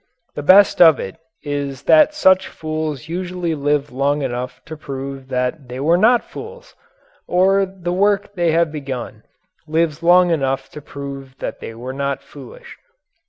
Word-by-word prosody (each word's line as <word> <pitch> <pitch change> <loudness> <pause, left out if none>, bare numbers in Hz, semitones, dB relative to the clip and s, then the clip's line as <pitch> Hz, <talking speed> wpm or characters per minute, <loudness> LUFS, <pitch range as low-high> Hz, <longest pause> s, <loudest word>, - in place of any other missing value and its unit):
The - - -5
best 190 +7 +5
of 160 -5 +7
it - - -6 0.3
is 140 -2 -4
that 305 -1 +5
such 190 -10 +4
fools 155 -2 -5
usually 180 0 -3
live 145 -1 -1
long 140 +3 0
enough 125 0 -4
to 160 - -8
prove 135 -2 -7
that 125 +2 -2
they 125 +1 -7
were 160 +5 +3
not 225 +6 +4
fools 485 +2 -11 0.5
or 195 +2 +3
the 180 -2 -5
work 200 +1 +1
they 175 -3 0
have 165 -1 +2
begun 135 -5 -6 0.5
lives 155 -1 0
long 175 +1 +5
enough 135 -4 -1
to 150 - -9
prove 140 -2 -8
they 115 - -6
were 125 +3 -7
not 140 0 -3
foolish. 140 -2 -13
155 Hz, 155 wpm, -19 LUFS, 135-180 Hz, 0.5 s, of